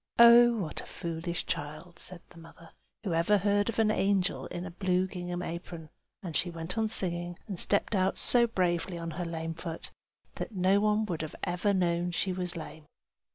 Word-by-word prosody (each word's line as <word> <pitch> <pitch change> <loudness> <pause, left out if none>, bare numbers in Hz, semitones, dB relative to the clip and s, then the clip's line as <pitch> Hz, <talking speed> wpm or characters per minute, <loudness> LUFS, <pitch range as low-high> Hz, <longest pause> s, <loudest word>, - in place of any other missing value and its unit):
"Oh, 235 0 +8
what 170 -8 -3
a - - -12
foolish 170 +1 -4
child!" 155 +4 -5
said 180 -2 -10
the 170 - -14
mother. 165 0 -15 0.3
"Who 190 -6 -1
ever 170 +6 +3
heard 205 +2 +2
of 230 - -3
an 220 -1 +3
angel 195 -2 +1
in 175 +1 -5
a 185 - -6
blue 185 0 +1
gingham 180 -1 -5
apron?" 170 -2 -7 0.3
and 170 -4 -5
she 175 - +1
went 165 +2 -4
on 220 -1 +1
singing, 175 -4 -2
and 195 -5 -3
stepped 200 +2 +2
out 190 -1 +1
so 240 -1 +3
bravely 180 -4 0
on 165 0 -5
her 175 +3 -4
lame 165 -1 -4
foot 165 0 -7 0.5
that 220 - -5
no 190 +2 +3
one 210 +1 +2
would 175 -7 -3 0.2
ever 180 +3 0
have 200 - +3
known 175 -1 +1
she 185 +2 -1
was 180 -1 -3
lame. 155 -2 -8
180 Hz, 195 wpm, -30 LUFS, 170-200 Hz, 0.5 s, Oh